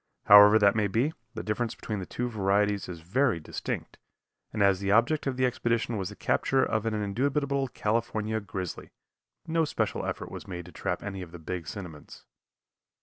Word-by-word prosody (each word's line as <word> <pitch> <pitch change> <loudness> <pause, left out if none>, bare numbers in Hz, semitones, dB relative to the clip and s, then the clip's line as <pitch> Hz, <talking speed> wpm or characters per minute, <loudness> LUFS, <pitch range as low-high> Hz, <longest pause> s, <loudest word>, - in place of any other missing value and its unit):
However 105 +1 +9
that 100 -2 +5
may 105 -2 +2
be, 120 +10 0 0.2
the 110 - -4
difference 110 +2 -2
between 105 -2 -4
the 90 - -6
two 125 - -3
varieties 100 -2 +1
is 85 -2 -7
very 115 - +1
distinct, 75 - -5 0.5
and 105 -2 +1
as 100 -2 +4
the 100 0 -2
object 120 +8 +3
of 130 -2 -1
the 130 - +3
expedition 115 -2 0
was 95 -3 -3
the - - -10
capture 135 -1 +1
of 110 0 -1
an 110 - 0
indubitable 135 +6 0
California 110 -2 -1
grizzly, 95 -3 -6 0.6
no 165 0 +1
special 150 - -1
effort - - -4
was - - -8
made 90 -2 -6
to 90 - -12
trap - - -3
any 100 -2 -5
of 85 -2 -9
the 85 - -9
big 85 0 -5
cinnamons. 85 -7 -9
105 Hz, 185 wpm, -28 LUFS, 95-120 Hz, 0.6 s, However